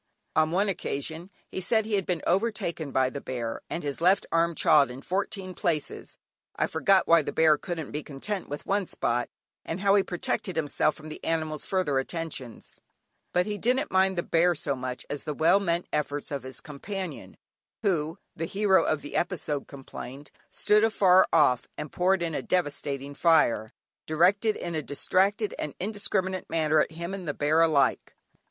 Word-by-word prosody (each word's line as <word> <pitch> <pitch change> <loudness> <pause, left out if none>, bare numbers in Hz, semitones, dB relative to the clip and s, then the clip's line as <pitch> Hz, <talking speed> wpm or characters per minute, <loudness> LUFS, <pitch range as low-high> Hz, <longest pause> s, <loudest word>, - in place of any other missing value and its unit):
On 155 0 +4
one 190 +5 +1
occasion, 160 -1 -3 0.2
he 190 - -3
said 220 +4 +2
he 220 - -4
had 195 -3 +1
been 175 -4 -1
overtaken 190 -6 0
by 130 -1 +2
the 140 - -6
bear, 120 -3 -4
and 170 - -4
his 145 +1 -4
left 185 +3 +4
arm 165 0 +2
chawed 145 -3 +5
in 130 +2 -9
fourteen 190 0 -3
places 160 -4 -2 0.4
(I - - +1
forget 190 +4 +3
why 170 0 +6
the - - -4
bear 160 -1 +5
couldn't 165 -2 -5
be 150 - -3
content 175 +8 -5
with 145 +1 -6
one 200 -2 0
spot 120 +1 -1 0.3
and 165 - -4
how 195 0 +4
he 200 - +5
protected 180 0 -2
himself 155 -1 +1
from 155 0 -10
the 155 - -9
animal's 155 -2 -2
further 170 -8 +1
attentions); 135 -5 -6 0.5
but 180 0 +2
he 210 -1 -4
didn't 255 +3 +1
mind 190 0 +3
the 175 - 0
bear 170 +1 +3
so 145 -2 -1
much 130 -1 -5
as 145 - -5
the 150 - -4
well 165 +6 +4
meant 175 -3 0
efforts 145 -1 -2
of 140 -1 -2
his 130 0 -6
companion, 185 +6 -7 0.5
who, 165 -5 0 0.2
the 165 - -3
hero 195 0 +3
of 155 -2 0
the 145 - -7
episode 155 -5 -1
complained, 135 0 -9 0.2
stood 210 +1 +3
afar 190 -4 +5
off 145 -7 +3
and 150 - -6
poured 185 0 +2
in 165 -1 -2
a 140 - -1
devastating 145 -4 -2
fire, 130 -9 +3 0.4
directed 190 +7 +3
in 170 - -5
a 155 - -1
distracted 195 +9 +1
and 150 - -4
indiscriminate 190 -2 -1
manner 155 -1 +2
at - - +1
him 170 +3 -5
and 190 -3 -6
the 145 - -2
bear 155 +3 +2
alike. 150 -5 +2
165 Hz, 180 wpm, -27 LUFS, 145-190 Hz, 0.5 s, why